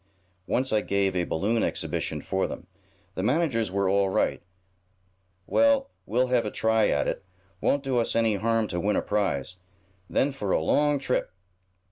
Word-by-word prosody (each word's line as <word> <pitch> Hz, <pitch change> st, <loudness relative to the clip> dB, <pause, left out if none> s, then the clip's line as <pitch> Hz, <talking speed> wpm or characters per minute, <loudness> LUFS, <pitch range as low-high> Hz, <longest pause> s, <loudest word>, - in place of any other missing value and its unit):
Once 130 Hz, 0 st, 0 dB
I 105 Hz, -, +3 dB
gave 100 Hz, -2 st, 0 dB
a 90 Hz, -1 st, +1 dB
balloon 105 Hz, +9 st, 0 dB
exhibition -, -, -2 dB
for 95 Hz, 0 st, -1 dB
them. -, -, -8 dB, 0.5 s
The 95 Hz, -, -3 dB
managers 120 Hz, -, +1 dB
are 100 Hz, +1 st, 0 dB
all 100 Hz, 0 st, +2 dB
right. -, -, 0 dB, 1.0 s
Well, 280 Hz, -, +3 dB, 0.2 s
we'll 125 Hz, +4 st, +1 dB
have 125 Hz, -2 st, +3 dB
a 105 Hz, -, -2 dB
try 110 Hz, 0 st, +2 dB
at 70 Hz, -, +1 dB
it. -, -, -3 dB, 0.4 s
Won't 140 Hz, 0 st, +1 dB
do 130 Hz, -3 st, +1 dB
us 115 Hz, -, -1 dB
any 115 Hz, -3 st, +2 dB
harm 115 Hz, +1 st, +1 dB
to 90 Hz, -, -2 dB
win 105 Hz, +4 st, +1 dB
a -, -, 0 dB
prize. 95 Hz, -5 st, -1 dB, 0.5 s
Then 140 Hz, -, +1 dB
for 120 Hz, -8 st, -5 dB
a -, -, +3 dB
long 145 Hz, -, +2 dB
trip!" 130 Hz, -7 st, -1 dB
110 Hz, 170 wpm, -26 LUFS, 100-130 Hz, 1.0 s, I